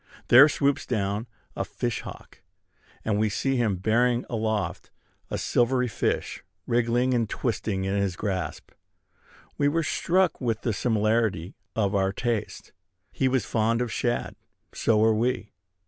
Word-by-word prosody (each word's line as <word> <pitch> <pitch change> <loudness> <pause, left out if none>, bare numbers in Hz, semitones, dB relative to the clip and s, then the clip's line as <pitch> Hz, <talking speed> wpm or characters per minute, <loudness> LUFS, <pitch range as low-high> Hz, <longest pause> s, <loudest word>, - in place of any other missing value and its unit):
There 140 +5 +9
swoops 140 -2 0
down 105 0 -1 0.3
a - - -1
fish 120 -3 -3
hawk; - - -11 0.6
and 105 -2 +1
we 110 0 +2
see 135 +6 0
him 110 -5 +1
bearing 120 +5 +1
aloft 110 -2 -2 0.4
a - - -2
silvery 125 +1 +1
fish, 110 - -2 0.2
wriggling 120 +2 +1
and 115 -3 +1
twisting 110 -5 -2
in 95 +1 -1
his 100 -3 0
grasp. 95 -7 -4 0.9
We 145 - +3
were 165 +3 +1
struck 180 +1 +1
with 115 -3 -1
the 115 - 0
similarity 110 -5 0 0.2
of 100 -2 +1
our 95 -1 +2
tastes. 115 +1 -3 0.4
He 130 - 0
was 130 -4 +1
fond 115 +1 +1
of 125 -2 -2
shad: 120 +1 -1 0.4
so 115 - +2
were 110 +1 +4
we. 115 -1 -1
115 Hz, 145 wpm, -26 LUFS, 105-125 Hz, 0.9 s, There